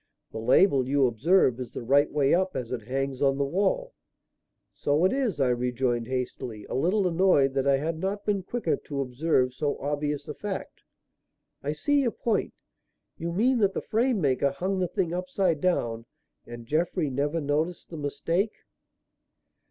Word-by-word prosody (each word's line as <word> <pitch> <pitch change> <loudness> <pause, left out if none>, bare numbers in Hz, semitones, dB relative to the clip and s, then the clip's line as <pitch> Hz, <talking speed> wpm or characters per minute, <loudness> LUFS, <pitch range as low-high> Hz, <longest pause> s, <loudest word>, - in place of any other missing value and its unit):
"The - - -5
label, 130 - +4
you 140 -1 +3
observe, 130 - +3
is 125 -2 -6
the - - -5
right 140 +5 +3
way 145 -2 +2
up 185 +1 +1
as 125 -3 -4
it 115 -4 -5
hangs 135 0 -2
on 135 -1 +3
the 140 - +1
wall." 205 - 0 0.8
"So 145 +5 +1
it 190 - +3
is," 255 - -1
I 135 -2 +3
rejoined 125 -1 0
hastily, 125 -4 -4
a - - -7
little 185 +8 +2
annoyed 165 -6 +3
that 135 0 0
I 140 -1 +4
had 160 +3 -3
not 195 +3 -3
been 205 -2 +1
quicker 190 -2 -1
to 140 -2 -4
observe 130 0 +1
so 145 +2 -2
obvious 145 0 -2
a 150 - -4
fact. 200 +2 -6 0.8
"I 145 +2 -2
see 285 - +1
your 255 - +2
point. 225 -1 -1 0.6
You 170 +1 -3
mean 240 +8 +2
that 200 -2 +2
the - - -1
frame 235 0 +1
maker 140 -3 +2
hung 185 +8 -2
the 180 - +1
thing 175 -1 -1
upside 180 -3 0
down 115 -10 0 0.4
and 120 0 -9
Jeffrey 160 +2 0
never 145 +5 -1
noticed 155 +5 -2
the 165 - -6
mistake?" 165 +8 -1
150 Hz, 175 wpm, -27 LUFS, 130-185 Hz, 0.8 s, label